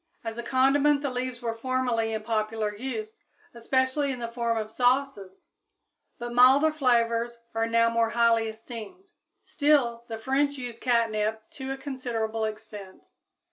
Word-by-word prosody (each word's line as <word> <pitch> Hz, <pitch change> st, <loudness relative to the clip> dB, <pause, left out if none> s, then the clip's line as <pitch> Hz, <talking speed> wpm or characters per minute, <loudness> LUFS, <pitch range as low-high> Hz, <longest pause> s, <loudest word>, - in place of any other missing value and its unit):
As 225 Hz, 0 st, -5 dB
a -, -, -1 dB
condiment 275 Hz, +4 st, +3 dB
the 280 Hz, -, -1 dB
leaves 250 Hz, 0 st, -4 dB
were 230 Hz, -1 st, -1 dB
formerly 240 Hz, -2 st, -1 dB
in 220 Hz, -1 st, -3 dB
popular 215 Hz, -1 st, -1 dB
use, 430 Hz, -, -5 dB, 0.3 s
especially 260 Hz, +4 st, 0 dB
in 260 Hz, -, -4 dB
the 235 Hz, -1 st, -4 dB
form 235 Hz, -1 st, -1 dB
of 215 Hz, 0 st, -4 dB
sauces; 245 Hz, -6 st, 0 dB, 0.7 s
but 240 Hz, 0 st, -6 dB
milder 265 Hz, +5 st, +6 dB
flavors 235 Hz, -4 st, +1 dB, 0.2 s
are 225 Hz, 0 st, 0 dB
now 230 Hz, 0 st, +3 dB
more 230 Hz, 0 st, +1 dB
highly 230 Hz, -1 st, +3 dB
esteemed. 225 Hz, -, -9 dB, 0.4 s
Still, 290 Hz, -10 st, +2 dB
the 225 Hz, -, -5 dB
French 280 Hz, +5 st, 0 dB
use 245 Hz, -3 st, -7 dB
catnip 220 Hz, -3 st, 0 dB
to 265 Hz, -1 st, -7 dB
a 270 Hz, -, -3 dB
considerable 230 Hz, -5 st, -3 dB
extent. 215 Hz, -3 st, -9 dB
235 Hz, 145 wpm, -27 LUFS, 225-265 Hz, 0.7 s, milder